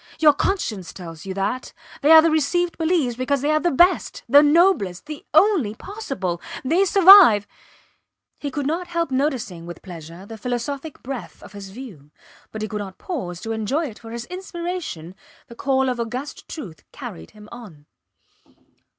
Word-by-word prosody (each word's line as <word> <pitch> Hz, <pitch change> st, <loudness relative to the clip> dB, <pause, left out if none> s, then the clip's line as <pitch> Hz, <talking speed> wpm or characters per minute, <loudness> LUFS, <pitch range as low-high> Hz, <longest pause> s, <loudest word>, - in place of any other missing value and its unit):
Your 305 Hz, -2 st, +6 dB
conscience 225 Hz, -, -2 dB
tells 165 Hz, -1 st, -10 dB
you 190 Hz, -, -4 dB
that. 205 Hz, +7 st, -3 dB, 0.3 s
They 290 Hz, -, +2 dB
are 320 Hz, 0 st, +10 dB
the 330 Hz, -, +3 dB
received 340 Hz, +3 st, +1 dB
beliefs 320 Hz, -7 st, +1 dB
because 255 Hz, +2 st, -1 dB
they 295 Hz, -, +2 dB
are 310 Hz, -, +3 dB
the 350 Hz, -, +1 dB
best, 350 Hz, +5 st, +2 dB
the 285 Hz, -, +7 dB
noblest, 295 Hz, -, +3 dB
the 305 Hz, -1 st, -8 dB
only 315 Hz, -, +3 dB
possible. 220 Hz, -, -5 dB, 0.2 s
They 340 Hz, +8 st, +3 dB
survive.... 375 Hz, -, +8 dB, 0.9 s
He 285 Hz, -, -4 dB
could 285 Hz, 0 st, -4 dB
not 335 Hz, +5 st, -2 dB
help 335 Hz, -3 st, -2 dB
noticing 255 Hz, -, -2 dB
with 175 Hz, -1 st, -9 dB
pleasure 170 Hz, 0 st, -10 dB
the 220 Hz, +1 st, -10 dB
philosophic 265 Hz, +6 st, -4 dB
breadth 260 Hz, -2 st, -7 dB
of -, -, -13 dB
his 200 Hz, -1 st, -9 dB
view, 195 Hz, -, -11 dB, 0.4 s
but 215 Hz, 0 st, -5 dB
he -, -, -2 dB
could 210 Hz, -1 st, -5 dB
not 190 Hz, -2 st, -8 dB
pause 185 Hz, -, -5 dB
to 225 Hz, -, -5 dB
enjoy 225 Hz, +9 st, -1 dB
it, 215 Hz, -, -13 dB
for 225 Hz, -, -11 dB
his 235 Hz, +1 st, -6 dB
inspiration, 350 Hz, -, -6 dB, 0.3 s
the -, -, -13 dB
call 265 Hz, +1 st, +1 dB
of 250 Hz, -2 st, -2 dB
august 245 Hz, +5 st, -5 dB
truth, 180 Hz, -, -8 dB
carried 80 Hz, 0 st, -9 dB
him 210 Hz, 0 st, -13 dB
on. 200 Hz, -12 st, -12 dB
255 Hz, 170 wpm, -22 LUFS, 200-320 Hz, 0.9 s, are